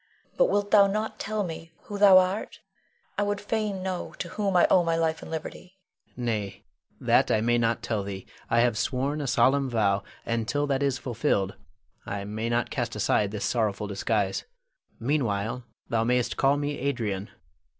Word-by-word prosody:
But -, -, +4 dB
wilt 205 Hz, 0 st, 0 dB
thou 200 Hz, -2 st, +7 dB
not 215 Hz, +2 st, -2 dB
tell 215 Hz, 0 st, -2 dB
me 165 Hz, -2 st, -7 dB
who 205 Hz, -1 st, -6 dB
thou 200 Hz, -2 st, +8 dB
art? 185 Hz, +3 st, +1 dB, 0.6 s
I -, -, +3 dB
would 205 Hz, 0 st, 0 dB
fain 205 Hz, -2 st, -2 dB
know 185 Hz, -2 st, -4 dB
to 175 Hz, -, -5 dB
whom 200 Hz, -1 st, -1 dB
I 175 Hz, -, +6 dB
owe 180 Hz, -, +6 dB
my 165 Hz, -1 st, +1 dB
life 160 Hz, -1 st, 0 dB
and -, -, -9 dB
liberty. 170 Hz, +3 st, -7 dB, 0.4 s
Adrian. 125 Hz, -, -5 dB
Nay, 105 Hz, -4 st, -3 dB, 0.4 s
that -, -, +3 dB
I -, -, +3 dB
may 120 Hz, +2 st, +2 dB
not 115 Hz, 0 st, 0 dB
tell 110 Hz, -3 st, -1 dB
thee. 100 Hz, -1 st, -6 dB, 0.2 s
I 115 Hz, -, +4 dB
have 120 Hz, -2 st, +2 dB
sworn 140 Hz, +5 st, -1 dB
a 140 Hz, -, -3 dB
solemn 135 Hz, +2 st, +3 dB
vow, 100 Hz, -4 st, +2 dB, 0.2 s
and 115 Hz, -1 st, -1 dB
till 145 Hz, +3 st, 0 dB
that 140 Hz, -1 st, 0 dB
is 140 Hz, -2 st, +1 dB
fulfilled 115 Hz, -6 st, -1 dB, 0.5 s
I 100 Hz, 0 st, -4 dB
may 110 Hz, +3 st, -3 dB
not 120 Hz, 0 st, 0 dB
cast -, -, -2 dB
aside 105 Hz, -, +2 dB
this 105 Hz, 0 st, -3 dB
sorrowful 110 Hz, -4 st, 0 dB
disguise. 100 Hz, 0 st, -1 dB, 0.5 s
Meanwhile, 115 Hz, -3 st, -1 dB, 0.2 s
thou 115 Hz, -1 st, +1 dB
mayst 125 Hz, 0 st, +1 dB
call 140 Hz, +1 st, +3 dB
me 145 Hz, 0 st, -2 dB
Adrian. 115 Hz, -7 st, -2 dB
130 Hz, 180 wpm, -27 LUFS, 110-175 Hz, 0.6 s, thou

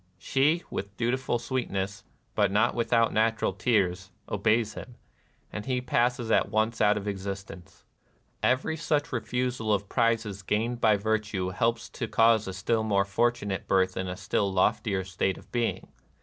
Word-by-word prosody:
She, 145 Hz, -, +1 dB
with 100 Hz, 0 st, -5 dB
dutiful 120 Hz, +1 st, 0 dB
sweetness, 105 Hz, -5 st, -3 dB, 0.3 s
but -, -, +2 dB
not 110 Hz, +4 st, +3 dB
without 115 Hz, -1 st, +2 dB
natural 110 Hz, -2 st, +1 dB
tears, 95 Hz, -3 st, 0 dB, 0.2 s
obeys 110 Hz, +1 st, +1 dB
him; 125 Hz, +2 st, -9 dB, 0.6 s
and 105 Hz, -, -4 dB
he 130 Hz, -1 st, +1 dB
passes 120 Hz, -1 st, 0 dB
at -, -, +3 dB
once 110 Hz, +2 st, 0 dB
out 105 Hz, 0 st, +4 dB
of 105 Hz, 0 st, -5 dB
existence. 95 Hz, -2 st, -6 dB, 0.6 s
Every 130 Hz, +5 st, +1 dB
such 150 Hz, -1 st, -1 dB
refusal 125 Hz, -2 st, -1 dB
of 100 Hz, -1 st, +2 dB
the -, -, -27 dB
prizes 115 Hz, -4 st, 0 dB
gained 115 Hz, +5 st, -1 dB
by 110 Hz, -3 st, +5 dB
virtue 105 Hz, -3 st, -1 dB
helps 115 Hz, +4 st, 0 dB
to 115 Hz, -, -4 dB
cause 115 Hz, -1 st, +4 dB
a 95 Hz, -, -4 dB
still 105 Hz, +4 st, 0 dB
more 100 Hz, -3 st, +2 dB
fortunate 105 Hz, -1 st, -1 dB
birth 95 Hz, -1 st, +2 dB
in 95 Hz, -, -3 dB
a 90 Hz, 0 st, -5 dB
still 100 Hz, 0 st, 0 dB
loftier 100 Hz, +1 st, +1 dB
state 95 Hz, 0 st, -1 dB
of -, -, -16 dB
being. 120 Hz, -1 st, -1 dB
110 Hz, 160 wpm, -28 LUFS, 100-120 Hz, 0.6 s, by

